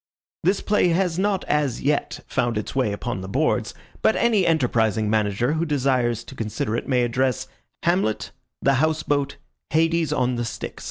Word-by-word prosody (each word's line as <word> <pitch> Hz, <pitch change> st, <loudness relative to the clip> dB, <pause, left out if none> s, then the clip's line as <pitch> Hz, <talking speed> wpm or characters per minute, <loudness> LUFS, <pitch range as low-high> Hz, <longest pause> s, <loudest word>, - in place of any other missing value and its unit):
This 190 Hz, +4 st, +2 dB
play 210 Hz, -3 st, +2 dB
has 175 Hz, 0 st, +1 dB
not 200 Hz, -1 st, +1 dB
as 145 Hz, -5 st, 0 dB
yet 145 Hz, +1 st, 0 dB
found 120 Hz, -4 st, 0 dB
its 105 Hz, -, -4 dB
way 130 Hz, -6 st, +1 dB
upon 100 Hz, -1 st, -4 dB
the 95 Hz, -, -7 dB
boards, -, -, 0 dB, 0.3 s
but 220 Hz, -, +3 dB
any 220 Hz, -6 st, +3 dB
enterprising 110 Hz, -8 st, +2 dB
manager 110 Hz, +5 st, +1 dB
who 160 Hz, +1 st, 0 dB
desires 130 Hz, -6 st, +1 dB
to -, -, -11 dB
consider 110 Hz, -2 st, -2 dB
it -, -, -3 dB
may 125 Hz, -2 st, +2 dB
address 125 Hz, +1 st, 0 dB, 0.4 s
Hamlet, 170 Hz, -, +1 dB, 0.3 s
The 140 Hz, -, +4 dB
House 155 Hz, 0 st, +1 dB
Boat, 140 Hz, -1 st, -1 dB, 0.3 s
Hades 165 Hz, +1 st, +2 dB
on 125 Hz, -1 st, +1 dB
the 120 Hz, -, -1 dB
Styx. -, -, -6 dB
135 Hz, 170 wpm, -23 LUFS, 115-165 Hz, 0.4 s, The